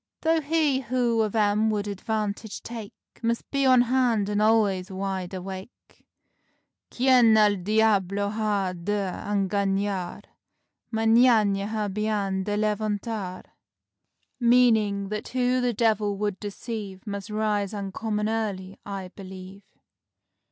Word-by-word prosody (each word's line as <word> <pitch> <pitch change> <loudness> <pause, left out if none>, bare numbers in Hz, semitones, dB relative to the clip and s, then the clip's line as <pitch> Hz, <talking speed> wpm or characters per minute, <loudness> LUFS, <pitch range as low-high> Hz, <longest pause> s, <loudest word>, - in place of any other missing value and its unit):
Though 325 0 +2
he 300 -2 +1
who 245 -2 +1
of 215 0 -1
'em 210 0 +2
would 210 -1 -1
advantage 210 +1 -3
take, 225 -2 -7 0.3
Must 235 0 -1
be 275 -1 +2
on 255 -1 +6
hand 240 -5 +1
and 205 0 0
al'ays 210 -4 +2
wide 190 -1 -4
awake: 190 +3 -9 0.8
Quien 245 -3 +5
el 210 -1 +4
diablo 200 0 +1
ha 205 -4 -1
de 195 +2 -2 0.2
engañar 200 -1 -1 0.7
Mañana 225 -3 +4
ha 215 -1 -2
bien 200 -2 -1
de 205 0 -1
levantar." 210 -2 -2 0.9
Meanin' 220 -5 +3
that 215 +1 -4
"who 255 0 +1
the 245 0 +1
devil 215 -3 +1
would 205 -1 -2
deceive, 205 -2 -6
Must 200 -2 -5
rise 210 -2 0
uncommon 210 +1 -3
early," 200 -4 -3
I 195 -2 -6
believe. 190 0 -10
210 Hz, 115 wpm, -26 LUFS, 195-225 Hz, 0.9 s, on